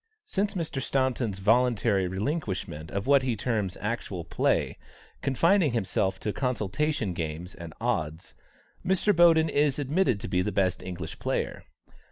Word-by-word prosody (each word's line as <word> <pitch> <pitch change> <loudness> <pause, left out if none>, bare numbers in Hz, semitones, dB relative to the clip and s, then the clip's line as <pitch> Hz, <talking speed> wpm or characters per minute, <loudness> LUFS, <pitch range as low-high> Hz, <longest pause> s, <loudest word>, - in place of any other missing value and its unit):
Since 200 +1 -1
Mr. 160 -6 -2
Staunton's 130 -7 0
voluntary 110 -2 +2
relinquishment 95 - -3
of 100 0 -3
what 140 0 +5
he 130 -3 -1
terms 105 -4 -1
"actual 105 -5 -3
play," - - 0 0.4
confining 165 +2 +3
himself 95 -3 0
to 105 +1 -2
consultation 125 - -1
games 85 +2 -5
and 85 -2 -9
"odds," 85 -10 -2 0.5
Mr. 190 +2 +2
Boden 165 -2 +6
is 145 -2 +2
admitted 145 - +1
to - - -4
be 90 -1 +1
the 105 - -1
best 95 -3 +1
English 90 -3 -6
player. - - -2
115 Hz, 140 wpm, -27 LUFS, 95-145 Hz, 0.5 s, Boden